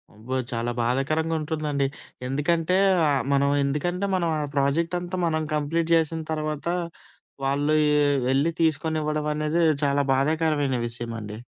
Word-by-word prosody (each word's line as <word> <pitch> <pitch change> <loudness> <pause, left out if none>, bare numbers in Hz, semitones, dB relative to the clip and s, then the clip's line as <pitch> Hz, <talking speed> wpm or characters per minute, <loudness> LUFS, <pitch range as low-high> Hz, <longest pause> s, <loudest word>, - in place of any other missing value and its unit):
అబ్బో! 115 +5 -5 0.2
చాలా 120 0 -2
బాధాకరంగా 145 +7 0
ఉంటుందండి. 150 -3 -1 0.4
ఎందుకంటే 165 +6 +1 0.3
ఆహ్, 140 -2 +1
మనం 140 0 +3
ఎందుకంటే 175 +7 -1
మనం 170 -2 0
ఆ - - -1
ప్రాజెక్ట్ 150 +6 +1
అంతా 180 +1 -5
మనం 160 -1 0
కంప్లీట్ 160 +3 -1
చేసిన 160 0 +1
తర్వాత, 155 0 -3 0.8
వాళ్ళు 145 +2 +1 0.3
ఎ - - +3 0.3
ఎళ్ళి 145 +5 +2
తీసుకొనివ్వడం 155 -1 0
అనేది 155 +3 0 0.2
చాలా 140 0 +2
బాధాకరమైన 145 -1 +1
విషయమండి. 115 -3 -5
150 Hz, 125 wpm, -25 LUFS, 140-160 Hz, 0.8 s, మనం